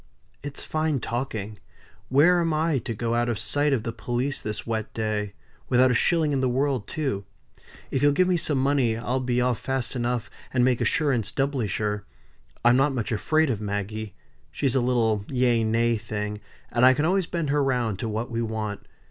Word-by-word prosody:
"It's 145 0 -5
fine 155 -3 0
talking. 110 -4 -4 0.5
Where 170 +7 +5
am 165 -2 +1
I 155 -2 +1
to 115 0 -5
go 115 +2 -1
out 120 0 +1
of 115 - -1
sight 145 +5 +1
of 125 -6 +1
the 115 - -3
police 120 +5 -2
this 105 -1 -5
wet 110 -2 -3
day: 105 -2 -2 0.4
without 130 0 +5
a - - +3
shilling 155 +5 +2
in 135 -2 +1
the 130 - +2
world 130 -3 0
too? 135 -10 -2 0.7
If 135 - 0
you'll 145 0 +5
give 180 +6 +3
me 185 - +3
some 160 -4 +1
money 130 -4 +2
I'll 125 +3 -1
be 125 -1 0
off 125 -2 +1
fast 130 -2 -3
enough, 120 -1 -1 0.2
and 125 -1 +3
make 125 -2 +2
assurance 140 -9 +1
doubly 135 -4 0
sure. 105 +2 -2 0.6
I'm 120 +1 +6
not 135 0 +2
much 115 -3 -2
afraid 155 +7 +2
of 110 -3 -3
Maggie. 105 +1 -4 0.3
She's 135 -4 -1
a 135 - +2
little 115 -4 +1
yea 125 -3 +2
nay 115 +1 +2
thing, 105 -1 -4 0.3
and 120 - +1
I 130 +1 +7
can 150 - +1
always 185 0 +2
bend 165 -5 -2
her 145 0 +2
round 120 -7 0
to 115 - -2
what 110 +3 -3
we 115 0 -1
want. 110 -2 -4
125 Hz, 200 wpm, -25 LUFS, 110-140 Hz, 0.7 s, I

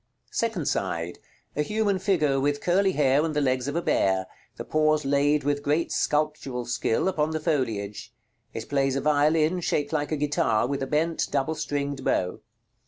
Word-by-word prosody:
Second 225 -10 -1
side. 85 -3 -2 0.4
A 150 - +1
human 205 +3 0
figure, 155 -8 +2
with 145 +1 0
curly 190 +3 +2
hair 140 -1 +3
and 160 -2 -2
the - - +2
legs 130 -2 0
of 145 - -3
a 170 - 0
bear; 95 -1 +2 0.3
the - - -6
paws 155 -1 +2
laid, 145 +1 +2
with 145 0 0
great 150 +4 0
sculptural 150 -5 -1
skill, 120 +4 0
upon 155 -5 +1
the 160 0 -2
foliage. 110 - -2 0.4
It 110 - -6
plays 135 -2 +1
a 135 - 0
violin, 155 +3 +2
shaped 145 -3 -1
like 150 -1 -1
a 155 - 0
guitar, 145 -6 +1
with 140 +2 -2
a 135 - -2
bent 160 +3 0
double 140 +2 0
stringed 140 -3 -3
bow. 90 -6 0
145 Hz, 175 wpm, -26 LUFS, 135-155 Hz, 0.4 s, hair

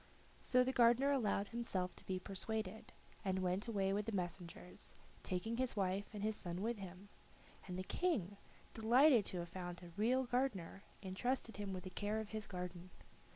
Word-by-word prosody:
So 250 0 +5
the 260 - +1
gardener 245 +3 +6
allowed 210 -6 +2
himself 195 -6 -1
to - - -12
be 185 - 0
persuaded, 200 +2 -3 0.3
and 190 -2 +1
went 185 +3 0
away 195 -4 +1
with 210 +2 0
the - - 0
messengers, 180 -2 -5 0.3
taking 220 +6 -2
his 255 -3 +1
wife 195 0 +1
and 205 -2 -5
his 215 0 +1
son 175 0 -4
with 230 -1 -1
him; 190 +1 -8 0.6
and 180 -1 -4
the 185 - -2
King, 205 - 0 0.4
delighted 235 +1 +6
to 185 - 0
have 175 0 -3
found 175 0 -5
a 175 - -9
real 250 +5 +3
gardener, 240 -8 -1 0.2
entrusted 230 +5 -1
him 205 -1 -3
with 185 -1 -4
the 185 - -6
care 205 +4 -1
of 220 -1 -4
his 215 -1 -3
garden. 180 -1 -5
200 Hz, 180 wpm, -39 LUFS, 185-230 Hz, 0.6 s, gardener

